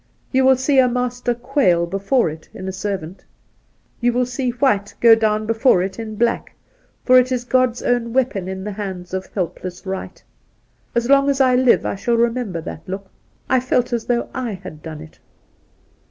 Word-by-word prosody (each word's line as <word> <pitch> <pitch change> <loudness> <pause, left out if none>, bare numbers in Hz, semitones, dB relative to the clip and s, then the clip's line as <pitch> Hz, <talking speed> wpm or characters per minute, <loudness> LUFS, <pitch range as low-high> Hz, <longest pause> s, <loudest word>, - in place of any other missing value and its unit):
You 260 0 +3
will 265 0 +6
see 265 +2 +2
a 255 - +6
master 245 0 -1
quail 240 -9 +2
before 195 +7 +1
it 155 - -12
in 190 - -7
a - - -2
servant. 190 -2 -5 0.8
You 240 0 +2
will 250 +1 +1
see 250 +1 -2
White 235 -5 0
go 230 -1 +7
down 215 -1 +1
before 225 -4 +3
it 190 +2 -5
in 220 -1 -6
Black; 235 +2 -1 0.5
for 255 0 +7
it 255 +1 0
is 250 -1 -1
God's 255 -1 +1
own 240 -1 0
weapon 240 -7 0
in 190 0 -5
the 210 - -4
hands 190 -3 -6
of 190 0 -3
helpless 180 0 -4
right. 190 0 -6 0.7
As 235 0 +1
long 275 +1 +4
as 275 -1 0
I 255 -2 +4
live 250 -1 +4
I - - -1
shall 235 +4 0
remember 230 -7 0
that 160 - -7
look. 195 0 -6 0.4
I 260 - +3
felt 250 -1 0
as 235 -2 -1
though 240 -1 0
/ - - -27
had 195 -11 -6
done 155 -1 -8
it 160 0 -14
235 Hz, 190 wpm, -20 LUFS, 190-250 Hz, 0.8 s, go